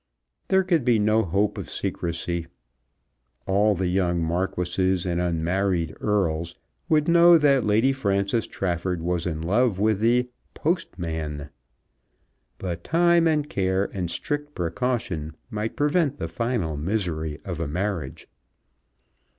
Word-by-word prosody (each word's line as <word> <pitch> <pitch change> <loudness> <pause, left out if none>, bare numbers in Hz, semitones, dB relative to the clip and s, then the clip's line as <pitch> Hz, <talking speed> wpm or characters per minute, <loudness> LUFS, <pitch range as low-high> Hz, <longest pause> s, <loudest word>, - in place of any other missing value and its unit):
There 190 0 +3
could 170 -6 +1
be 120 -2 +3
no 110 +1 +3
hope 100 +2 0
of - - -7
secrecy. 85 0 -3 1.0
All 100 +2 +3
the 95 +1 -1
young 90 -1 +1
marquises 90 +2 0
and 85 -1 0
unmarried 85 0 0
earls 85 -5 0 0.3
would 155 -1 +3
know 170 0 +7
that 140 -4 +3
Lady 110 +6 +3
Frances 100 -2 0
Trafford 90 -2 -2
was 90 0 -1
in 80 -2 -3
love 105 +4 +2
with 105 0 +2
the 120 +3 +3 0.3
"postman." 80 - -3 1.1
But 90 -3 -5
time, 170 0 +3
and 150 -2 +1
care, 95 -6 0
and 90 -3 -3
strict 145 - -3
precaution 85 -4 -2 0.2
might 110 +1 -3
prevent 145 -1 +1
the - - -3
final 115 -10 -2
misery 80 -3 -2
of 85 -4 -4
a 85 - -2
marriage. 90 -3 -3
95 Hz, 125 wpm, -25 LUFS, 85-125 Hz, 1.1 s, know